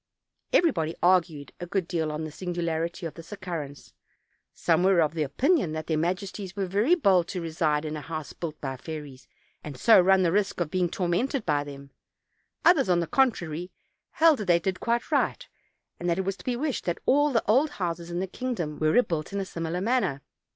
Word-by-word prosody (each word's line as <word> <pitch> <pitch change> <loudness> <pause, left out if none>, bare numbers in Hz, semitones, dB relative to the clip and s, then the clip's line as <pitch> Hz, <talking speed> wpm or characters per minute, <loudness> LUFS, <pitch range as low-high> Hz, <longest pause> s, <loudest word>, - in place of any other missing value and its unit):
Everybody 170 - +2
argued 165 -6 +2
a 175 - -6
good 185 -1 -1
deal 160 -4 -1
on 150 +1 -4
the 155 - -5
singularity 170 0 -3
of 165 - -5
this 165 +2 -12
occurrence; 170 -8 -6 0.6
some 165 -1 +1
were 190 -1 +4
of 155 -1 +2
opinion 170 - +1
that 155 0 -4
their 160 - 0
majes 180 +5 -1
ties 190 -3 -7
were 200 -1 -1
very 210 - +3
bold 190 - +3
to 185 - -4
reside 160 -2 0
in 155 0 -3
a 150 - -5
house 155 -1 -6
built 160 -3 -6
by 135 -2 -4
fairies, 145 -3 -8 0.4
and 145 -3 -7
so 220 - +6
run 190 +1 +4
the 170 - +2
risk 200 0 0
of 165 -3 -2
being 180 -2 +1
tormented 205 - -1
by 145 -3 +1
them; 140 -1 -10 0.7
others, 290 - +5
on 175 -1 +4
the 170 - 0
contrary, 175 - 0 0.4
held 320 -4 +4
that 210 - -3
they 175 -2 +4
did 185 +2 -2
quite 235 +1 -1
right, - - 0 0.5
and 175 - -2
that 170 - +1
it 190 - -1
was 195 0 -2
to - - -15
be 250 - 0
wished 280 +2 -2
that 175 -1 -1
all 290 +2 +4
the 230 - +1
old 265 +9 +4
houses 170 -8 -4
in 175 0 -3
the 190 - -1
king 250 +6 -4
dom 150 -6 -4
were 155 - +2
rebuilt 165 -6 +1
in 200 - -2
a 195 - -2
similar 165 0 -4
manner. 200 - 0
175 Hz, 210 wpm, -27 LUFS, 160-200 Hz, 0.7 s, so